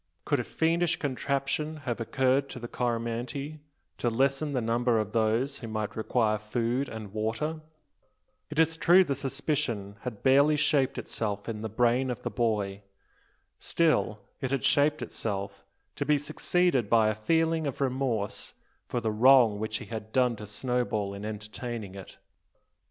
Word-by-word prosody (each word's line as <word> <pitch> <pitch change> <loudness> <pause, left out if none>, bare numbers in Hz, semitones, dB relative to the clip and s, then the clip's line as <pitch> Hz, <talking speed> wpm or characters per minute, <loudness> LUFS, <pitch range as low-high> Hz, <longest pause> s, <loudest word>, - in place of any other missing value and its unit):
Could 145 -3 +1
a - - -1
fiendish 170 +5 +1
conception 140 +2 -2
have 120 -2 -2
occurred 135 +4 +1
to 125 - -7
the 120 - -6
Coromantee, 120 +5 -3 0.4
to 120 - +1
lessen 135 +5 +1
the 130 - +1
number 115 +1 +1
of 110 -2 -1
those 115 +5 +1
who 115 - -7
might 110 -1 -3
require 110 -1 +1
food 120 +5 -1
and 110 -3 -8
water? 115 +9 -2 0.9
It 150 - -7
is 160 0 +3
true 180 +3 +6
the 145 -6 -1
suspicion 135 -7 -2
had 120 -5 -6
barely 140 +3 +5
shaped 145 -3 +2
itself 105 -2 -3
in 110 -2 -4
the 110 - -3
brain 120 +4 +2
of 125 - -4
the - - -3
boy. 105 -4 -1 0.8
Still, 155 -10 +1 0.2
it 130 - -2
had 135 -1 -1
shaped 150 +1 +3
itself, 100 -2 -4 0.3
to - - 0
be 150 +1 +3
succeeded 150 - +1
by 110 -2 +5
a - - +1
feeling 160 +7 +1
of 135 - -4
remorse 130 -6 -2 0.3
for 120 - -2
the 110 - 0
wrong 115 -1 +6
which 110 0 -2
he - - -8
had 110 -1 -7
done 125 -1 +2
to 105 - -8
Snowball 110 -2 -1
in 100 +1 -7
entertaining 110 0 -5
it. 95 -1 -10
120 Hz, 160 wpm, -28 LUFS, 110-140 Hz, 0.9 s, true